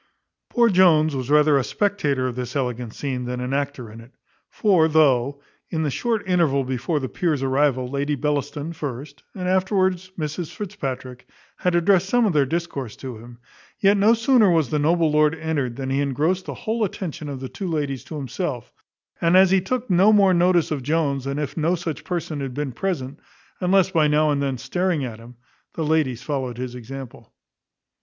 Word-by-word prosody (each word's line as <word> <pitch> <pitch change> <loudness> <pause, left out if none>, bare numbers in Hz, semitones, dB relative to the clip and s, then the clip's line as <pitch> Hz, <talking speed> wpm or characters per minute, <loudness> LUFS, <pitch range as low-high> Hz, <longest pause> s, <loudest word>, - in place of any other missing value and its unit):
Poor 240 -1 +3
Jones 165 -7 +4
was 130 -1 -4
rather 150 -1 +5
a - - 0
spectator 150 -9 0
of 125 -2 -3
this 125 +3 -5
elegant 125 -4 -2
scene, 130 -3 -3
than 125 0 -4
an 125 +2 -3
actor 140 -5 -3
in 115 +1 -11
it; 115 +3 -16 0.4
for 185 -7 +3
though, 140 -3 +3 0.3
in 160 -1 -1
the 150 - -1
short 225 - -2
interval 165 -7 +2
before 130 +5 -2
the 130 - -3
peer's 155 -2 -1
arrival, 130 -1 +1
Lady 140 +3 -1
Bellaston 145 +2 -2
first, 140 -1 -7
and 180 -2 -4
afterwards 185 -1 +1
Mrs 160 +1 -4
Fitzpatrick, 130 -11 -6 0.3
had 180 -1 0
addressed 185 +2 +3
some 245 0 +3
of 200 - +1
their 145 -3 +3
discourse 155 -7 -4
to 125 -4 -8
him; 120 +1 -13 0.4
yet 200 +1 +4
no 210 +3 +4
sooner 230 -2 +4
was 160 -7 +2
the 150 - +1
noble 165 +1 +2
lord 150 +1 +3
entered, 150 -7 -2
than 135 0 -4
he 135 +1 +1
engrossed 155 +7 0
the - - -5
whole 225 +1 -2
attention 170 -6 -4
of 135 -2 -5
the 130 - -5
two 195 - -6
ladies 145 -6 -2
to 160 - -8
himself; 135 - -4 0.5
and 170 +2 +4
as 190 -1 +6
he 190 -1 +4
took 250 +6 -2
no 190 +3 +5
more 200 -3 +5
notice 175 -1 +3
of 145 -3 -1
Jones 140 -1 0
than 140 +1 -3
if 150 -3 -3
no 165 +2 +1
such 170 -3 -5
person 165 -4 -3
had 135 -2 -5
been 145 -2 -3
present, 145 -2 -3 0.4
unless 190 0 +3
by 160 -4 +3
now 150 +1 +3
and 140 -1 0
then 135 -2 -1
staring 160 +3 -1
at 115 -3 -7
him, 120 +2 -13 0.4
the 160 - -2
ladies 145 -6 0
followed 130 -5 -3
his 125 -1 -5
example. 125 +1 -9
150 Hz, 195 wpm, -23 LUFS, 135-180 Hz, 0.5 s, as